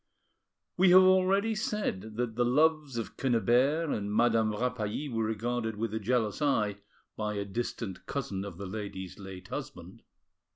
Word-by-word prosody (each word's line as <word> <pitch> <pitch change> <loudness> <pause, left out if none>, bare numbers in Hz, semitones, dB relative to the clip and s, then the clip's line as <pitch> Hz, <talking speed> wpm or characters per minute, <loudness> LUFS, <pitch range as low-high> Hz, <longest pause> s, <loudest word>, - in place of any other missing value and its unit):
We 185 +1 +5
have 185 +1 +9
already 190 +4 +4
said 200 - -3
that 120 -2 -2
the 120 - +2
loves 150 +1 +2
of 115 - -5
Quennebert 135 +5 +2
and 105 -1 -3
Madame 110 0 +3
Rapally 120 +3 -2
were 115 -4 -1
regarded 110 +1 -2
with 110 0 -3
a 110 - -1
jealous 110 0 0
eye 105 -8 +1 0.4
by 105 -1 -2
a 100 0 -2
distant 105 -1 -5
cousin 105 -9 -3
of 100 -4 -8
the 100 - -6
lady's 95 -2 -6
late 95 -1 -9
husband. - - -7
115 Hz, 155 wpm, -30 LUFS, 105-140 Hz, 0.4 s, have